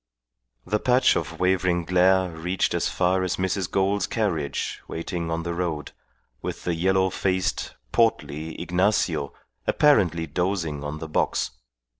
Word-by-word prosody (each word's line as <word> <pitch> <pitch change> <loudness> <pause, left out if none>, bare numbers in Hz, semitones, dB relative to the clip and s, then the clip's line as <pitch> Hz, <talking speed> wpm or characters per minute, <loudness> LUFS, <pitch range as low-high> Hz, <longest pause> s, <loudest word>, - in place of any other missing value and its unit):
The 105 +4 0
patch 125 +3 +4
of - - -3
wavering 90 -2 +2
glare 90 +1 +3
reached 85 +3 -1
as - - 0
far 95 +1 +1
as 95 -1 0
Mrs. 95 -1 -1
Gould's 100 0 +1
carriage 80 - -2
waiting 85 0 -4
on 80 0 -2
the 85 0 -3
road, 85 -4 -3 0.5
with - - -5
the 90 - 0
yellow 95 +2 +2
faced, 95 0 -1 0.2
portly 80 - 0
Ignacio 90 -5 +1 0.4
apparently 95 - +3
dozing 80 -2 -2
on 75 +1 -4
the 80 +1 -6
box. 75 - 0
90 Hz, 135 wpm, -25 LUFS, 80-95 Hz, 0.5 s, patch